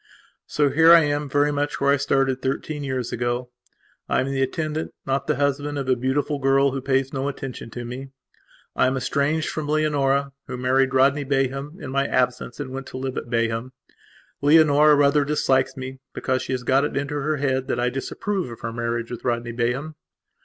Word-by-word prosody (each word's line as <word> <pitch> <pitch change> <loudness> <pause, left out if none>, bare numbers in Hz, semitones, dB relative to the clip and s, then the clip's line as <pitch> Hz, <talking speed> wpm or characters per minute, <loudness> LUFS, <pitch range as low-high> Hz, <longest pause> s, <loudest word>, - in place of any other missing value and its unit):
So 145 -2 +1
here 165 +2 +6
I 170 - +8
am 145 -1 -1
very 145 +2 +2
much 145 0 -2
where 140 0 +3
I 140 - +4
started 135 -1 +1
thirteen 145 +2 -3
years 130 -3 -3
ago. 120 +1 -2 0.6
I - - +2
am 130 - +1
the 135 -1 -1
attendant, 155 +3 -2
not 135 0 -1
the 150 - +2
husband, 145 +1 -1
of 135 -2 -3
a 130 - +3
beautiful 140 +4 -1
girl, 135 0 +3
who 135 0 -3
pays 135 0 0
no 135 0 -2
attention 135 -4 -6
to 120 +1 -7
me. 130 +3 -7 0.7
I - - +3
am 130 +1 0
estranged 145 +5 0
from 155 -2 -4
Leonora, 140 -2 +1 0.2
who 125 - -5
married 130 +1 +2
Rodney 140 +2 +4
Bayham 135 +3 -1
in 130 - -7
my 140 +1 +1
absence 125 0 -1
and 135 -3 -5
went 135 0 -6
to - - -7
live 130 0 -4
at - - -5
Bayham. 115 +1 -1 0.7
Leonora 150 0 +6
rather 145 0 +4
dislikes 135 -2 +1
me, 130 0 -7 0.2
because 130 0 -1
she - - -3
has 125 -1 -3
got 130 +3 +3
it 145 - -2
into 140 +1 -2
her 150 +1 -1
head 130 -2 0
that - - -1
I 125 +1 +1
disapprove 185 - -3
of 115 - -10
her 115 0 -4
marriage 115 0 -3
with 120 - -6
Rodney 120 -1 -1
Bayham. 125 +6 -2
135 Hz, 200 wpm, -23 LUFS, 130-145 Hz, 0.7 s, I